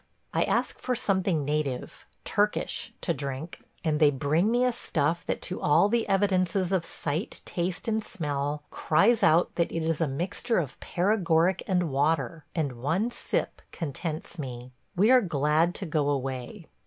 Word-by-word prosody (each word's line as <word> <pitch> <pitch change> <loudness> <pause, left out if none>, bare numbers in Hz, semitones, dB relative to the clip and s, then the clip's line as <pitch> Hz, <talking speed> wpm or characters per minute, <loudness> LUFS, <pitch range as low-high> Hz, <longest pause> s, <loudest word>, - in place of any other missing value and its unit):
I - - +2
ask - - 0
for 250 - -1
something 190 -8 +1
native 145 -3 -3
– - - -32
Turkish - - 0
– - - -42
to - - 0
drink, 140 +3 -5 0.2
and 155 -3 +1
they 150 -2 +6
bring 145 +8 +1
me 245 +2 +3
a 250 - +2
stuff 165 -4 -1
that - - -2
to 185 - -2
all 150 +7 +4
the 230 -1 0
evidences 190 -2 +2
of 185 -4 +1
sight, 160 +7 -3
taste, 180 +5 -3
and 220 -1 0
smell 145 -3 -2
cries 205 +9 +3
out 165 +3 +4
that 170 - +1
it 165 - -2
is 165 0 0
a 165 - +3
mixture 175 - -1
of 150 -7 -2
paregoric 180 -2 +2
and 180 -5 +1
water, 145 +1 0
and 140 -8 -2
one 180 - 0
sip - - -3
contents 160 +1 -5
me. 125 -3 -6 0.2
We 210 +7 +4
are 255 -1 +7
glad 160 - +1
to 195 - -3
go 150 -3 0
away. 135 - -3
165 Hz, 170 wpm, -27 LUFS, 145-190 Hz, 0.2 s, are